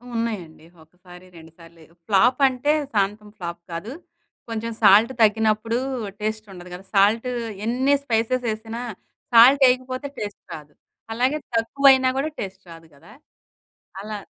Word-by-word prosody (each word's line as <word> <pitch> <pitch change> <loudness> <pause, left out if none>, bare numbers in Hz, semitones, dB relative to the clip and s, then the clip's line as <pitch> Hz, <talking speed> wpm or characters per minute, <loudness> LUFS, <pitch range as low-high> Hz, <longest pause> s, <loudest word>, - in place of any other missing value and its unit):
ఉన్నాయండి. 200 -9 -4 0.2
ఒకసారి, 180 +2 -17
రెండుసార్లేయో 165 0 -17
ఫ్లాపంటే, 255 +6 +3 0.2
శాంతం 210 +1 -1
ఫ్లాప్ 170 -2 -7
కాదు. 170 +8 -6 0.6
కొంచెం 230 0 -4
సాల్ట్ 215 +4 +6
తగ్గినప్పుడూ, 220 +1 +2 0.4
టేస్టుండదు 210 -4 -6
గదా! 180 +2 -10
సాల్టు 215 +5 +3 0.3
ఎన్ని 255 +4 +1
స్పైసెసేసినా, 230 -2 -2 0.5
సాల్టేయకపోతే 255 +2 +5
టేస్ట్ 205 -1 -6
రాదు. 150 -1 -11 0.4
అలాగే 255 +6 0 0.2
తక్కువయినా 260 +3 +4
గూడా, 285 +3 -1
టేస్ట్ 190 0 -8
రాదు 165 0 -13
గదా! 170 +9 -18 0.9
అలా 210 +1 -6
220 Hz, 105 wpm, -22 LUFS, 190-250 Hz, 0.9 s, సాల్ట్